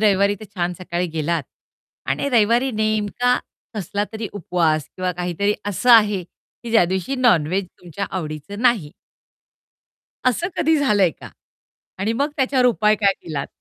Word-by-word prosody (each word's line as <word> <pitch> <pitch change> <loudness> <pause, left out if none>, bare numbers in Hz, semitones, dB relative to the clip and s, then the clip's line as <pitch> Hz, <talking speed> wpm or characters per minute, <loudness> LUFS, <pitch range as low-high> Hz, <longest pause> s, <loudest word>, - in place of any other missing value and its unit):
रविवारी 200 -1 +3
तर - - -8
छान 175 -1 -1
सकाळी 180 0 -2
गेलात 160 0 0 0.7
आणि 280 - 0
रविवारी 240 +2 +3
नेमका 215 +3 +1 0.4
कसला 205 0 -2
तरी 220 -2 -4
उपवास 165 -5 0
किंवा 185 0 -1
काहीतरी 180 +4 -1
असं 205 +5 +1
आहे, 210 -4 +6
की 230 +6 -14
ज्यादिवशी 190 +1 +2
नॉन-व्हेज 190 - +2
तुमच्या 180 +3 -5
आवडीचं 160 +3 -5
नाही. 220 -12 +2 1.4
असं 335 +9 +1
कधी 320 +1 +3
झालं 210 -9 +2
आहे 180 - +5
का? - - -12 0.7
आणि 210 +4 0
मग 280 +5 0
त्याच्यावर 260 -2 +2
उपाय 215 -3 +3
काय 200 -2 +4
केलात? 145 -4 -4
205 Hz, 140 wpm, -21 LUFS, 180-230 Hz, 1.4 s, आहे